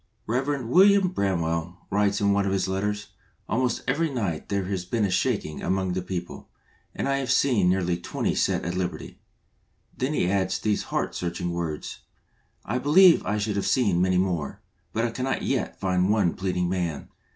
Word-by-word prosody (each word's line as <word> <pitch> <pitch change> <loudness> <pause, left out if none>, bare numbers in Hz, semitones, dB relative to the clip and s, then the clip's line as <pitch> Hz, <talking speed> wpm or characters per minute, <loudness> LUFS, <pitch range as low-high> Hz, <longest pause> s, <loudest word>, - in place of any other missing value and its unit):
R 110 - -1
ev. 135 0 -1
william 190 - +5
BRAMWELL 85 - -1
writes 100 0 +2
in 100 -1 +3
one 100 0 +1
of - - 0
his 95 -1 0
letters, 105 +2 -2 0.4
"Almost 125 +1 0
every 160 +5 +1
night 100 - -3
there 100 -2 -1
has 95 -1 -2
been 105 +3 0
a 95 - -1
shaking 95 -5 -1
among 95 0 0
the 95 - -1
people, 90 -1 -6 0.5
and - - -2
I 135 0 +1
have 135 -1 -1
seen 125 -9 +3
nearly 90 -2 +1
twenty 85 - -2
set - - 0
at 85 - -2
liberty/* 90 -1 -4 0.8
Then 135 +4 -1
he 90 - +1
adds 95 0 +1
these 105 -2 -1
heart - - -1
searching 90 0 -3
words: 85 -3 -4 0.3
" - - -40 0.3
I 120 +4 -1
believe 165 +7 +6
I 105 - 0
should 105 -1 -1
have 100 - -1
seen 100 -9 +2
many 95 0 +2
more, 90 -6 -1 0.3
but 115 +1 0
I 120 - -1
cannot 130 +3 -2
yet - - -2
find 90 0 +1
one 105 -5 +2
pleading 90 -2 -1
man. 85 -5 -3
100 Hz, 185 wpm, -25 LUFS, 90-120 Hz, 0.8 s, believe